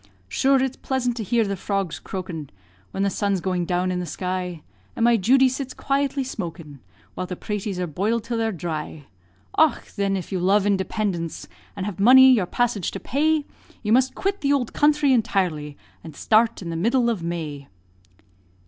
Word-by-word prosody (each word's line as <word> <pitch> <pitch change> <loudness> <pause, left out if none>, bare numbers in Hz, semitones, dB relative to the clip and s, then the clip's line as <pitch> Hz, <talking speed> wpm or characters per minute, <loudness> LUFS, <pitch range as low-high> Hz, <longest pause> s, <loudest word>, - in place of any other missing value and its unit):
Shure, 265 - +2
it's 265 -1 -3
pleasant 250 -2 -1
to 225 - -2
hear 230 +3 +2
the 200 0 -2
frogs 195 -2 -2
croakin', 175 -6 -6 0.4
When 195 - -2
the 200 - +1
sun's 200 0 0
going 180 -1 -1
down 180 +1 0
in 180 - -1
the 180 - -4
sky, 180 -3 -4 0.3
And 230 - -1
my 235 0 +5
Judy 260 +6 +4
sits 260 0 -4
quietly 275 0 0
smokin' 170 - -7 0.3
While 185 - -4
the 180 - -5
praties 205 0 -4
are 180 - 0
boil'd 205 +8 -1
till 230 0 -3
they're 225 0 0
dhry. 160 -4 -5 0.6
Och! 315 -5 +4
thin, 195 -1 -2
if 185 - -7
you 190 - -1
love 195 +3 +3
indepindence, 190 -3 -1 0.3
And 190 - -4
have 205 -1 -5
money 260 +5 +8
your 205 -7 +1
passage 235 -3 0
to - - -4
pay, 305 +2 +1 0.4
You 215 0 +2
must 260 +1 +3
quit 395 +1 -2
the 280 0 +2
ould 255 -5 -1
counthry 295 -2 +3
intirely, 180 - 0 0.3
And 160 -3 -10
start 220 +2 +2
in 170 - -5
the - - -4
middle 235 +8 +2
of 225 -6 0
May. 155 -5 -5
200 Hz, 185 wpm, -23 LUFS, 180-245 Hz, 0.6 s, money